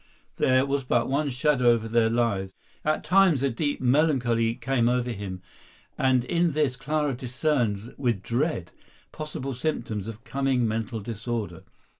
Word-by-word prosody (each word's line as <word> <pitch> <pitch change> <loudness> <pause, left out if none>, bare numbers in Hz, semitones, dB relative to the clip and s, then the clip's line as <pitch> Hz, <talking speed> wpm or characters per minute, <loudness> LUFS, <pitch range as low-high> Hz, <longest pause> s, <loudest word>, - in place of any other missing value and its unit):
There 130 +1 +3
was 140 0 -1
but 120 -2 +1
one 145 +2 0
shadow 130 -1 +2
over 115 -1 +2
their 115 0 +3
lives. 105 -5 0 0.3
At 155 0 0
times 180 -7 +4
a 140 - +2
deep 145 +5 -1
melancholy 125 -4 +2
came 120 -2 +1
over 125 0 0
him, 95 -4 -6 0.5
and 130 -2 +2
in 170 +1 +1
this 145 -4 +1
Clara 150 +2 -1
discerned 125 -4 -1
with 120 -8 0
dread 120 - -1 0.4
possible 140 -3 -5
symptoms 115 -7 -3
of 115 +1 -8
coming 135 -3 0
mental 110 +1 -3
disorder. 110 -5 -4
125 Hz, 145 wpm, -26 LUFS, 115-140 Hz, 0.5 s, times